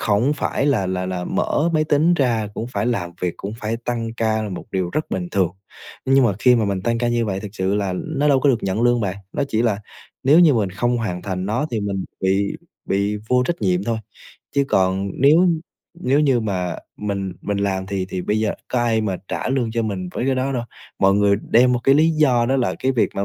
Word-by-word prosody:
khổng 110 +7 +2
phải 145 -1 -1
là 105 -10 +2
là 90 0 -2
là 90 -1 -3
mở 160 +3 0
máy 155 0 +3
tính 155 +4 +3
ra 120 -8 +1
cũng 115 - -4
phải 100 +3 -1
làm 95 -8 -1
việc, 90 -2 -1
cũng 100 +2 -6
phải 110 +2 -2
tăng 115 -2 -3
ca 110 -1 0
một 90 - -6
điều 90 -2 -1
rất 155 - -2
bình 90 -2 -2
thường. 95 -4 +1 0.5
Nhưng 135 0 +4
mà 110 - +3
khi 125 +2 +5
mà 110 - +1
mình 100 -2 -2
tăng 115 +3 0
ca 120 0 0
như 120 -1 +1
vậy 95 -2 -2
thực 105 - -6
sự 95 +1 0
là 100 -3 -1
nó 150 - -1
đâu 135 -2 +4
có 145 - +3
được 120 -4 +2
nhận 95 +4 -1
lương 120 0 +3
bạn, 100 -2 -2 0.2
nó - - -1
chỉ 110 +1 +1
là 110 -4 +1 0.5
nếu 150 +6 +6
như 155 -6 +6
mình 105 -4 0
không 120 +6 0
hoàn 90 -6 -3
thành 95 -1 -3
nó 120 +8 0
thì 110 -3 -1
mình 100 -2 -2 0.2
bị 95 +1 +1 0.3
bị 100 +2 0
vô 125 0 +3
trách 170 -10 -2
nhiệm 90 -1 +1
thôi, 115 -1 -1 0.6
chứ 140 - +4
còn 95 +1 +1
nếu 160 +7 +6 0.5
nếu 140 -2 +2
như 135 -5 +3
mà 90 -5 -2 0.2
mình 100 -2 -3
mình 100 -1 -2
làm 95 -1 -1
thì 95 -1 -2
thì 90 -1 -3
bây 105 - 0
giờ 110 - 0
có 125 - 0
ai 115 -2 +2
mà 100 -4 -1
trả - - -3
lương 130 -4 0
cho 115 - 0
mình 95 -4 -3
với 125 - -2
cái 135 - +2
đó 130 +1 -1
đâu. 120 -2 -1 0.4
Mọi 95 0 +4
người 100 0 +3
đem 125 +2 +5
một 120 - 0
cái 135 - +5
lý 160 +2 +4
do 130 -7 +3
đó 135 +2 +2
là 125 - 0
cái 130 +1 +1
việc 120 - +2
mà 100 - -1
110 Hz, 245 wpm, -21 LUFS, 95-130 Hz, 0.6 s, nếu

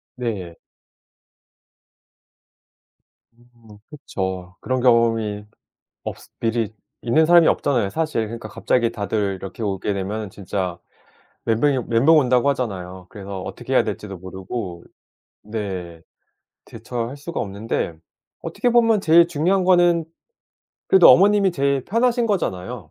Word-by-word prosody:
네. 100 -9 -5 2.8
음 120 -3 -19
그쵸. 95 -10 -5
그런 130 0 -1
경험이 115 -4 +2 0.6
없스 - - -8
미리 115 -2 -1 0.3
있는 155 +7 +3
사람이 170 -1 +6
없잖아요 120 -8 +1
사실. 155 -2 -1
그러니까 115 +2 -7
갑자기 120 -2 0
다들 100 -2 -2
이렇게 95 +4 -8
오게 100 -1 -2
되면은 100 +2 -4
진짜 95 -3 -4 0.7
멘붕이 125 +3 +1
멘붕 130 +8 +4
온다고 125 -1 +3
하잖아요. 95 -8 -4
그래서 100 -1 -7
어떻게 - - -7
해야 - - +4
될지도 100 -3 -6
모르고 95 0 -7 0.6
네. 95 -6 -6 0.6
대처할 120 +2 -6
수가 155 +4 -5
없는데 100 -3 -3 0.5
어떻게 245 - -1
보면 230 -3 +4
제일 170 0 +6
중요한 175 +4 +1
거는 175 -2 +4 0.8
그래도 190 -2 +7
어머님이 200 0 +5
제일 140 -3 0
편하신 240 +3 +1
거잖아요. 115 - -3
115 Hz, 280 characters per minute, -21 LUFS, 100-150 Hz, 2.8 s, 그래도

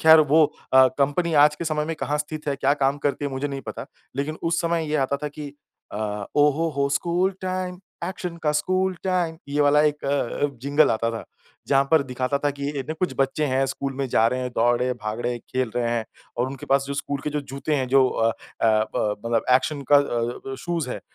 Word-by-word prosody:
ख़ैर 160 0 +9
वो 155 +1 +5 0.3
अ, 130 0 +8
कंपनी 145 +5 +1
आज 150 0 +3
के 170 - -4
समय 155 -1 0
में 165 - -3
कहाँ 150 0 -1
स्थित 150 0 -4
है? 140 - 0
क्या 140 +1 +2
काम 140 0 +1
करती 145 0 -1
है? 140 - -2
मुझे 135 +2 -2
नहीं 135 -1 -5
पता। - - -6 0.3
लेकिन 150 +3 -2
उस 165 0 +1
समय 170 -2 0
ये 150 - +1
आता 140 - -1
था 150 - -1
कि 145 0 -8 0.4
अ, 105 -1 -3
ओ 145 0 +6
हो 165 +3 0
हो 140 0 +2
स्कूल 175 +7 +1
टाइम 185 -1 -3 0.3
ऐक्शन 180 -2 -5
का 150 -1 +2
स्कूल 185 +5 +1
टाइम 175 -3 0
ये 145 +1 0
वाला 145 +1 +5
एक 150 -1 0
अ, 140 0 0 0.2
जिंगल 145 +1 +3
आता 115 +1 0
था। 115 - -6 0.4
जहाँ 135 0 +4
पर 160 -3 +5
दिखाता 130 +1 -2
था 145 - +3
कि 140 0 -4
ए, - - -1
ने 155 - -2
कुछ 180 +3 -1
बच्चे 135 +3 +1
हैं 130 0 +1
स्कूल 135 0 -3
में 135 -1 -1
जा 110 -1 +3
रहे 125 +1 -2
हैं 125 - -3
दौड़ 120 +1 +3
रहे 125 - 0
हैं 125 - -2
भाग 110 +2 -3
रहें 125 - 0
हैं 120 - -6
खेल 130 -2 -1
रहे 120 -1 0
हैं 115 -2 -1 0.3
और 120 +2 +1
उनके 135 -1 -8
पास 135 0 +3
जो 140 - -4
स्कूल 140 0 -3
के 150 - -1
जो 150 0 -1
जूते 140 +2 -3
हैं 130 -2 0
जो 130 0 +5
अ 115 0 +1
अ, - - -6 0.6
ब 105 -1 0
मतलब 115 -1 +1
ऐक्शन 140 +3 +2
का - - +10
अ 120 -2 -1
अ, - - -3
शूज़ 170 -5 -2
है - - -4
140 Hz, 245 wpm, -24 LUFS, 130-155 Hz, 0.6 s, का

